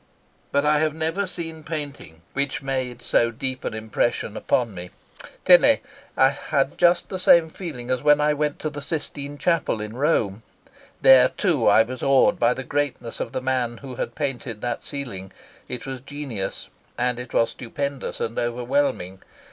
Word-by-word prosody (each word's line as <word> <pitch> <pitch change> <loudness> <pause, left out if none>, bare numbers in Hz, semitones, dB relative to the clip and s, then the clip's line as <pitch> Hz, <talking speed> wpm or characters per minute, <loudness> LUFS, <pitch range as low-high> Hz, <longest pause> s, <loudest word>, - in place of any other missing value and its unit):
But 140 +1 +2
I 150 0 +4
have 155 0 0
never 165 +5 -1
seen 165 -3 -5
painting 145 - -6
which 140 +1 -1
made 130 -3 -3
so 115 - +3
deep 130 +3 -3
an - - -3
impression 110 0 -1
upon 115 -2 0
me., 90 -1 -7 0.6
I 135 - +4
had 140 0 -1
just 175 0 +4
the 185 - -4
same 170 -2 +5
feeling 130 -10 -6
as 130 -1 0
when 150 0 +5
I 150 0 +3
went 150 0 -1
to 155 - -2
the 145 0 -7
Sistine 145 -2 -4
Chapel 165 -8 +1
in 105 +1 -6
Rome. 115 -8 +1 0.6
There 130 -1 +8
too 165 - +1
I 105 +2 +7
was 125 +2 -7
awed 135 -1 +4
by 120 +1 +3
the 135 - -5
greatness 140 -3 -3
of - - -3
the 130 -1 -3
man 125 -2 -1
who 135 0 -9
had 120 - -4
painted 130 -6 -3
that 120 - -3
ceiling. 100 -10 -6 0.4
It 125 -2 -5
was 135 -1 -5
genius, 135 -8 -5 0.3
and 125 0 0
it 125 -1 -7
was 115 - +2
stupendous 140 +2 -4
and 115 0 -2
overwhelming. 120 -6 -1
135 Hz, 170 wpm, -23 LUFS, 120-145 Hz, 0.6 s, There